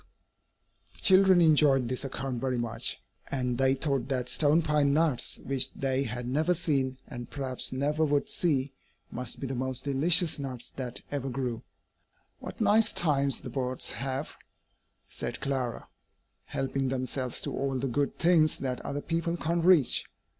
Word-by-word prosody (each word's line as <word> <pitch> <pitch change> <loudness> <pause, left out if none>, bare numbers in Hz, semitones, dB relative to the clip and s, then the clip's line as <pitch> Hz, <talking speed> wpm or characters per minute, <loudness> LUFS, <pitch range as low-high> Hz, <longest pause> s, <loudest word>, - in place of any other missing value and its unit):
] - - -41
The - - -19
children 190 -2 +6
enjoyed 145 -5 +4
this 130 +2 -3
account 135 -2 -4
very 130 -2 -1
much, 120 -1 -3 0.3
and 125 -2 -2
they 135 0 +3
thought 135 -3 -1
that 125 -3 -2
stone 155 +2 +3
pine 150 -2 +2
nuts 155 -6 +1
which 135 -1 +1
they 135 0 0
had 120 +1 -5
never 155 +7 +1
seen, 140 -6 0
and 120 -3 -8
perhaps 130 -3 -4
never 145 +4 0
would 145 -2 +1
see 140 -6 0 0.4
must 125 -1 -5
be - - -4
the 135 - -3
most 130 0 -3
delicious 155 +4 +3
nuts 130 -3 -6
that 125 -2 -5
ever 140 -2 -2
grew. 125 -3 -3 0.8
"What - - -9
nice 220 +1 +4
times 140 -5 +1
the 125 - -7
birds 130 0 -2
have," 135 +3 -3 0.8
said - - -4
Clara, 130 -4 -3 0.6
"helping 135 0 -2
themselves 130 -1 -2
to - - -3
all 135 -1 -1
the 135 +2 -1
good 140 +3 -1
things 165 -3 +3
that 130 -2 -3
other 145 +1 -3
people 170 +1 -1
can't 170 +1 -1
reach!" 170 -7 +4
135 Hz, 160 wpm, -29 LUFS, 130-150 Hz, 0.8 s, children